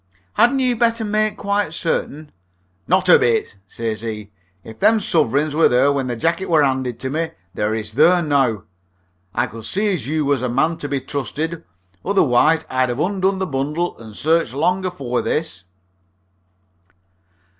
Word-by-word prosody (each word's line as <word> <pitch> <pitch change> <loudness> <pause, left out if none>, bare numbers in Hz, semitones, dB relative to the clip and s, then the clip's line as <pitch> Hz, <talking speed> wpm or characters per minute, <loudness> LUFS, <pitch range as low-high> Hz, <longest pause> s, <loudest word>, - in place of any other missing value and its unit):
"Hadn't 245 +3 +3
you 255 -2 +2
better 230 -1 +1
make 215 0 0
quite 200 -5 -1
certain 155 -2 -3 0.3
" 90 +1 -43
"Not 185 +1 +2
a 180 - +7
bit," 115 -3 0
says 110 0 -4
he. 105 -2 -6 0.3
"If 110 0 -12
them 225 0 +4
suvreigns 150 - +1
were 160 +2 +4
there 130 +3 +3
when 135 -2 -1
the 120 - -2
jacket 170 +10 -1
were 160 -3 +4
'anded 130 -3 -1
to 130 0 -3
me, 160 +2 -1 0.2
they 110 +3 -1
is 105 0 -8
there 170 +7 +4
now. 135 - +1 0.7
I 120 - +2
could 115 -2 -9
see 205 - 0
as 155 -8 -4
you 155 0 0
was 140 -3 +1
a 125 - -1
man 155 +7 +1
to 145 - -6
be 140 -1 -1
trusted, 150 +5 -4 0.4
otherwise 160 -4 +3
I'd 130 0 0
'ave 120 +4 -1
undone 190 0 0
the 190 - -1
bundle 150 +3 -2
and 110 -2 -11
searched 160 -5 +1
long 180 +6 +1
afore 135 -9 -2
this." 125 - -3
145 Hz, 170 wpm, -20 LUFS, 120-175 Hz, 0.7 s, a